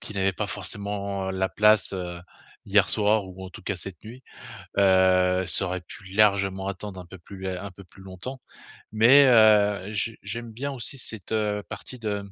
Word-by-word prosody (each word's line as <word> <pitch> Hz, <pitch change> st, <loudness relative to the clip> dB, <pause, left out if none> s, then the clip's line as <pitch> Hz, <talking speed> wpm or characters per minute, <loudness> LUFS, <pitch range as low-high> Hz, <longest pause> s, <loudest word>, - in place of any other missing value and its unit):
qui 105 Hz, -, -10 dB
n'avait 95 Hz, 0 st, +1 dB
pas 105 Hz, +2 st, -3 dB
forcément 100 Hz, -1 st, -4 dB
la 95 Hz, 0 st, -1 dB
place, 105 Hz, 0 st, +3 dB
heu, 90 Hz, -2 st, -5 dB, 0.5 s
hier 100 Hz, -1 st, +3 dB
soir 105 Hz, -1 st, +2 dB
ou, 95 Hz, +1 st, -10 dB
en 95 Hz, -, -9 dB
tout -, -, -12 dB
cas, 100 Hz, -, -3 dB
cette 90 Hz, -1 st, -8 dB
nuit. 120 Hz, +4 st, -11 dB, 0.6 s
Heu, 95 Hz, -1 st, +4 dB
ça 95 Hz, -, +2 dB
aurait 90 Hz, 0 st, -3 dB
pu 95 Hz, +2 st, -13 dB
largement 100 Hz, -2 st, +2 dB
attendre 100 Hz, 0 st, -6 dB
un -, -, -12 dB
peu 95 Hz, -, -11 dB
plus 95 Hz, +3 st, -12 dB
lè 95 Hz, -1 st, -3 dB
un 100 Hz, +1 st, -7 dB
peu 100 Hz, +2 st, -14 dB
plus 95 Hz, -, -18 dB
longtemps, 95 Hz, +8 st, -8 dB, 0.5 s
mais, 125 Hz, +6 st, +7 dB
heu, 105 Hz, -4 st, +4 dB
je 110 Hz, +2 st, -2 dB
j'aime 120 Hz, -1 st, -6 dB
bien 140 Hz, +5 st, -4 dB
aussi 135 Hz, +1 st, -5 dB
cette, 110 Hz, -6 st, -4 dB
heu, 105 Hz, -1 st, -1 dB
partie 110 Hz, +4 st, -8 dB
de, 105 Hz, -2 st, -2 dB
mmh, 100 Hz, -, -13 dB
100 Hz, 195 wpm, -25 LUFS, 95-110 Hz, 0.6 s, mais